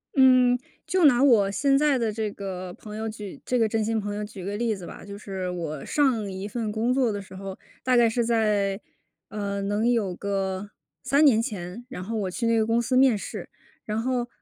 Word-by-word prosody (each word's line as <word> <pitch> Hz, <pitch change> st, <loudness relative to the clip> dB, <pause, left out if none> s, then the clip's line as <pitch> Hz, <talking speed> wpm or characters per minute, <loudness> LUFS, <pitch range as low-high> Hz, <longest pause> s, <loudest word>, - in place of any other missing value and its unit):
嗯， 255 Hz, -2 st, +6 dB, 0.3 s
就 350 Hz, +1 st, +3 dB
拿 260 Hz, -2 st, +6 dB
我 220 Hz, -8 st, +5 dB
现 275 Hz, +8 st, +2 dB
在 290 Hz, -1 st, +3 dB
的 230 Hz, -3 st, 0 dB
这 215 Hz, -1 st, -2 dB
个 185 Hz, -2 st, -6 dB
朋 210 Hz, +2 st, -10 dB
友 220 Hz, +1 st, -3 dB
举 210 Hz, -3 st, -8 dB
这 250 Hz, -, 0 dB
个 225 Hz, -2 st, +3 dB
真 220 Hz, 0 st, 0 dB
心 225 Hz, +1 st, 0 dB
朋 205 Hz, 0 st, -4 dB
友 210 Hz, -, -3 dB
举 205 Hz, -3 st, -8 dB
个 200 Hz, +1 st, -3 dB
例 230 Hz, -1 st, 0 dB
子 185 Hz, -3 st, -9 dB
吧。 -, -, -10 dB
就 200 Hz, 0 st, -8 dB
是 190 Hz, -3 st, -5 dB
我 160 Hz, -5 st, -4 dB
上 235 Hz, -9 st, +1 dB
一 190 Hz, +2 st, -5 dB
份 220 Hz, 0 st, -3 dB
工 225 Hz, +3 st, +1 dB
作 255 Hz, -3 st, +2 dB
的 205 Hz, -, -3 dB
时 190 Hz, -1 st, -12 dB
候， 195 Hz, 0 st, -7 dB, 0.3 s
大 255 Hz, -1 st, +3 dB
概 240 Hz, -1 st, +6 dB
是 235 Hz, +1 st, +1 dB
在， 210 Hz, -4 st, +1 dB, 0.5 s
呃， 200 Hz, -2 st, -3 dB
能 205 Hz, +4 st, +1 dB
有 210 Hz, -7 st, +1 dB
个 195 Hz, 0 st, -2 dB, 0.3 s
3 280 Hz, +4 st, +4 dB
年 230 Hz, -6 st, +5 dB
前， 210 Hz, 0 st, -6 dB
然 255 Hz, -9 st, -6 dB
后 225 Hz, +4 st, -4 dB
我 200 Hz, -4 st, -1 dB
去 235 Hz, +5 st, -3 dB
那 230 Hz, 0 st, +3 dB
个 220 Hz, -, +3 dB
公 230 Hz, +1 st, +2 dB
司 255 Hz, +2 st, -1 dB
面 255 Hz, -4 st, +5 dB
试。 -, -, -7 dB, 0.4 s
然 215 Hz, +1 st, -2 dB
后， 250 Hz, -1 st, 0 dB
220 Hz, 235 characters per minute, -26 LUFS, 200-245 Hz, 0.5 s, 嗯